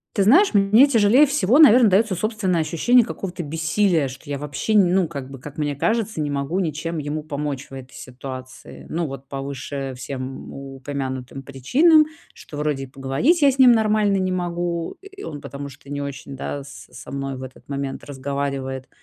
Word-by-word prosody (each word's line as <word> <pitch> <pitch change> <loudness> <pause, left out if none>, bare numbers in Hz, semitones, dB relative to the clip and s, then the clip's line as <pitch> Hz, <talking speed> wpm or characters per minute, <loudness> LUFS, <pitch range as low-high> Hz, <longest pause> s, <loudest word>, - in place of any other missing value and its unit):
Ты 200 - +3
знаешь, 280 - +5
мне 210 +7 +6
тяжелее 240 +3 +5
всего, 265 -2 +3
наверно, 245 -6 +8
даётся 200 +1 +3
собственное 190 -3 0
ощущение 225 +10 +3
какого-то 180 -3 -5
бессилия, 160 +1 +1
что 135 +2 -11
я 140 -1 -3
вообще, 145 +9 -3
не 195 -4 +5
ну, 185 -2 +2
как 140 -3 -7
бы, 135 - -9
как 145 +3 -10
мне 145 -1 -1
кажется, 220 - -1
не 145 -1 -1
могу 140 +6 -1
ничем 165 -1 -3
ему 150 +1 -3
помочь 145 -2 -4
в - - -14
этой 130 -1 -10
ситуации. 130 0 -9
Ну 170 +1 -1
вот, 135 -1 -8
по 135 0 -5
выше 135 0 -5
всем 130 0 -6
упомянутым 135 -1 -6
причинам, 295 - +4 0.3
что 145 - -11
вроде 150 -2 -1
и 135 - -7
поговорить 135 - +1
я 280 - +6
с 270 - -7
ним 255 -2 +8
нормально 215 -3 +3
не 185 -1 0
могу, 175 -1 -2
э, - - -10
и 395 0 -12
он, 145 -2 -7
потому 140 0 -7
что 140 +1 -14
не 145 0 -3
очень, 140 -1 -6
да, 140 +1 -5
со 140 - -13
со - - -10
мной 135 -1 -4
в 130 - -8
этот 130 +1 -12
момент 140 -1 -4
разговаривает. 135 -1 -4
150 Hz, 190 wpm, -22 LUFS, 135-200 Hz, 0.3 s, наверно